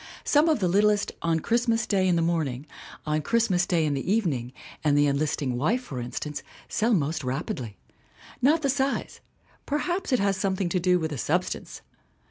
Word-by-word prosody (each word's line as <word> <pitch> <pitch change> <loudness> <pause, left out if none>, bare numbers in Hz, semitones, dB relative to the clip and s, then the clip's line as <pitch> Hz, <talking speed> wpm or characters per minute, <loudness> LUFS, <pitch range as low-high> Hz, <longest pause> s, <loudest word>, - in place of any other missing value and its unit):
Some 300 +3 +4
of 310 - +2
the 185 - +1
littlest 205 +3 +2
On 165 -1 +1
Christmas 235 +4 +1
Day 190 -2 +1
in 180 - +3
the 165 - +2
Morn 165 -3 +1
ing, 130 +2 -6 0.4
On 155 0 0
Christmas 190 -1 +1
Day 165 -3 +2
in 150 - 0
the 140 +7 -2
Evening, 150 - 0 0.3
and 145 -2 +3
The 145 - +5
En 140 -1 +2
listing 145 -4 -1
Wife, 220 - +1
for 135 - -6
instances 145 +5 -5 0.2
sell 225 +1 +1
most 155 -2 -1
rapidly. 125 - -4 0.6
Not 305 +5 +3
the 280 - +2
size; 270 0 -2 0.5
perhaps 345 +4 -1
it 255 - +4
has 200 -2 +1
something 190 -1 -1
to 180 - 0
do 180 +1 +3
with 160 -1 -3
the 145 - -4
sub - - +1
stance - - -7
180 Hz, 195 wpm, -26 LUFS, 150-225 Hz, 0.6 s, The